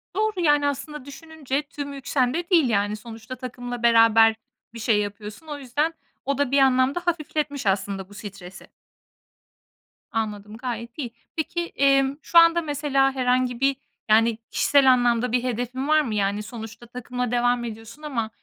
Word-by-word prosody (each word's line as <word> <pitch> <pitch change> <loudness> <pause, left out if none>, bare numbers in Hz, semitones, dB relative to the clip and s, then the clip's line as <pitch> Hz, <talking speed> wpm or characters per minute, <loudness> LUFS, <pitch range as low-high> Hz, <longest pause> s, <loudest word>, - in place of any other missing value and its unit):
Doğru, 425 -1 0
yani, 295 -3 +3
aslında 290 0 -5
düşününce 280 -1 -4
tüm 285 -1 -6
yük 275 -2 -10
sende 280 +7 0
değil 330 -8 +4
yani. 205 -1 +1
Sonuçta 225 +3 -9
takımla 245 -1 -7
beraber 225 -1 +6 0.4
bir 230 - -8
şey 220 -2 +2
yapıyorsun. 210 +7 -6
O 295 -1 -5
yüzden 290 +5 -1 0.3
o 275 0 0
da 285 -3 0
bir 280 - +4
anlamda 265 +3 +3
hafifletmiş 300 -5 -2
aslında 195 0 -1
bu - - -14
stresi. 195 -3 -10 1.4
Anladım, 210 -1 -4
gayet 235 -1 -6
iyi. 245 -6 -5 0.2
Peki, 340 +2 -2
emm, 275 0 +3
şu 340 - +5
anda 335 0 +5
mesela 285 -3 +1
herhangi 250 -1 +1
bir, 275 +1 +2 0.3
yani, 225 +1 +4
kişisel 275 -2 +4
anlamda 245 -1 +1
bir 250 0 +1
hedefin 250 +2 -3
var 310 0 +4
mı? 235 -8 -3
Yani, 205 +1 0
sonuçta 225 +1 -9
takımla 245 0 -4
devam 245 0 +1
ediyorsun 225 +4 -8
ama, 250 -8 -3
250 Hz, 155 wpm, -24 LUFS, 225-285 Hz, 1.4 s, beraber